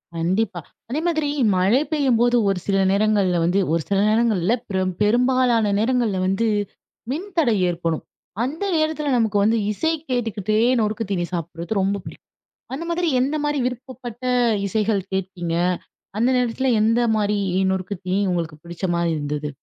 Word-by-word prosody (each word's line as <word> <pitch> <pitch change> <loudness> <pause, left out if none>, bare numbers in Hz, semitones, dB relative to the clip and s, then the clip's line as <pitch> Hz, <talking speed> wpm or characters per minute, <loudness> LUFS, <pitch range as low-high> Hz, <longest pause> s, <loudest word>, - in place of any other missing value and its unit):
கண்டிப்பா. 180 +3 0 0.3
அதேமாதிரி 315 +2 0 0.3
மழை 195 +9 +3
பெய்யும்போது 245 -5 +2
ஒரு 190 -2 0
சில 195 -1 +2
நேரங்கள்ல 200 -3 +2
வந்து 180 +4 +2
ஒரு 165 - +1
சில 195 -1 +2
நேரங்கள் 225 -2 +2
இல்ல, 215 - +3 0.2
ப்ர 190 -2 -1 0.2
பெரும்பாலான 240 0 +3
நேரங்கள்ல 230 -4 +1
வந்து 195 +4 +1 0.6
மின்தடை 330 - 0
ஏற்படும். 165 -2 -2 0.4
அந்த 295 +9 -3
நேரத்தில 310 -2 0
நமக்கு 220 -3 +1
வந்து 225 +2 +3
இசை 320 +10 0 0.2
கேட்டுக்கிட்டே 215 -4 -1 0.2
நொறுக்கு 220 +1 -1
தீனி 175 -3 0
சாப்பிட்றது 170 +4 -3
ரொம்ப 195 +1 +1
பிடிக்கும். - - -11 0.5
அந்த 330 +5 -5
மாதிரி 340 0 0
எந்தமாரி 295 +2 0
விருப்பப்பட்ட 250 -1 -7 0.4
இசைகள் 210 0 0
கேட்பீங்க? 180 -3 -3 0.6
அந்த 235 +3 +3
நேரத்தில 250 +2 0
எந்தமாரி 220 -2 +2 0.3
நொறுக்கு 190 +1 -2
தீனி 185 +2 +1
உங்களுக்கு 170 -3 -3
பிடிச்சமாரி 170 0 -1
இருந்தது? 150 0 -3
215 Hz, 130 wpm, -22 LUFS, 190-250 Hz, 0.6 s, மழை